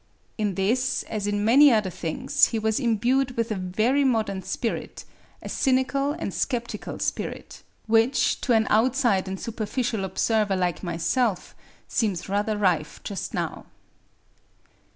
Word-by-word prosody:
In 210 -4 -1
this, 240 +8 0
as 205 -2 -4
in 205 0 0
many 275 +5 +7
other 210 -5 +1
things, 175 - +1
he 230 - -2
was 220 +1 0
imbued 250 +2 +1
with 230 0 -1
a - - 0
very 215 +9 +1
modern 220 -7 0
spirit, 230 +5 -4 0.4
a - - -6
cynical 275 +2 +1
and 200 - -5
sceptical 240 -3 -3
spirit, - - -4 0.2
which, 225 +4 +2
to 250 - +1
an 220 -1 +3
outside 230 -4 +2
and 190 0 -4
superficial 225 -1 -2
observer 205 +2 +1
like 180 -2 -1
myself, 185 +4 -1 0.3
seems 200 -7 -1
rather 205 +2 0
rife 175 -7 0
just 200 - -5
now. - - -4
220 Hz, 135 wpm, -25 LUFS, 195-250 Hz, 0.4 s, many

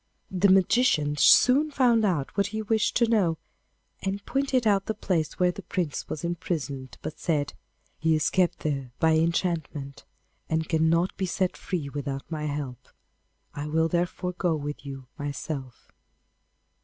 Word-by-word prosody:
The 190 +1 +3
magician 185 -6 +3
soon 265 - +6
found 245 -6 +3
out 170 -9 0
what 200 -1 +2
he 220 +1 -4
wished 220 0 +1
to 235 - +4
know, 195 -8 +2 0.6
and 195 +1 -3
pointed 270 -3 0
out 200 -2 +2
the 220 - -1
place 170 -6 -1
where 180 -1 +3
the 200 - -9
Prince 175 -7 -3
was 155 - -4
imprisoned, 150 -7 -3
but 155 - -6
said: 145 -4 0 0.5
'He 160 0 +3
is 155 - +1
kept 180 -2 +1
there 140 -4 -2
by 160 - +3
enchantment, 160 -4 -1 0.5
and 160 0 0
cannot 165 +2 +2
be 190 - -1
set 185 0 0
free 170 -7 -3
without 140 -1 -4
my 155 -1 -3
help. 145 -4 -5 0.7
I 145 +1 -5
will 160 +2 +2
therefore 175 +2 -1
go 175 -2 0
with 145 -1 -5
you 135 -1 -7
myself. 140 -2 -6
165 Hz, 155 wpm, -27 LUFS, 145-195 Hz, 0.7 s, soon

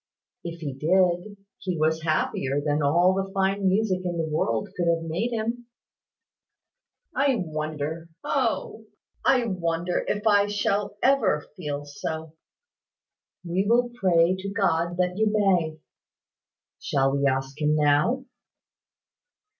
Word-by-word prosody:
"If 170 0 -7
he 145 -4 -4
did, 180 +6 +1 0.2
he 180 -2 -3
was 160 +1 +1
happier 145 -3 0
than 145 +1 0
all 170 +6 +4
the 195 0 -2
fine 195 0 +1
music 190 -1 +1
in 175 -1 -2
the 165 -1 -1
world 115 -8 -1
could 175 -1 -1
have 165 -1 +2
made 180 +9 -1
him." 235 +1 -3 1.5
"I 275 0 +3
wonder 155 +1 -4
O! 225 -4 -1 0.4
I 255 -3 +3
wonder 175 -3 -1
if 210 +1 -2
I 205 -2 +4
ever - - -6
shall 205 +6 +1
feel 145 -6 -4
so." 160 +2 -5 1.1
"We 185 +3 0
will 240 +1 +3
pray 180 -5 +3
to 200 +1 -4
God 175 -4 0
that 180 +1 0
you 220 - +3
may. 185 -7 +2 1.0
Shall 135 0 +1
we 140 0 +2
ask 135 +2 -2
Him 150 0 +3
now?" 150 - +2
175 Hz, 130 wpm, -25 LUFS, 155-205 Hz, 1.5 s, all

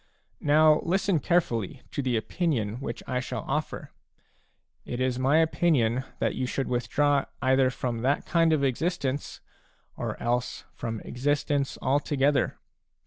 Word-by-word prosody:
Now 155 +1 +5
listen 190 0 +1
carefully 125 - 0
to - - -2
the 125 -3 0
opinion 115 - -1
which - - -5
I 125 -1 -1
shall 130 - -5
offer; - - -3 0.9
it 120 - -5
is 130 -1 0
my 135 +4 +3
opinion 145 -7 +2
that - - 0
you 130 - -2
should 135 +2 -2
withdraw 140 +3 +1
either 130 +1 +3
from 120 -2 -3
that 135 +4 +1
kind 165 -1 +3
of 155 -3 +2
existence, 140 0 -1 0.5
or - - -4
else 120 +1 -1
from 115 -2 -5
ex 125 - -8
istence 145 -1 +1
altogether. 140 0 +1
135 Hz, 140 wpm, -27 LUFS, 125-150 Hz, 0.9 s, Now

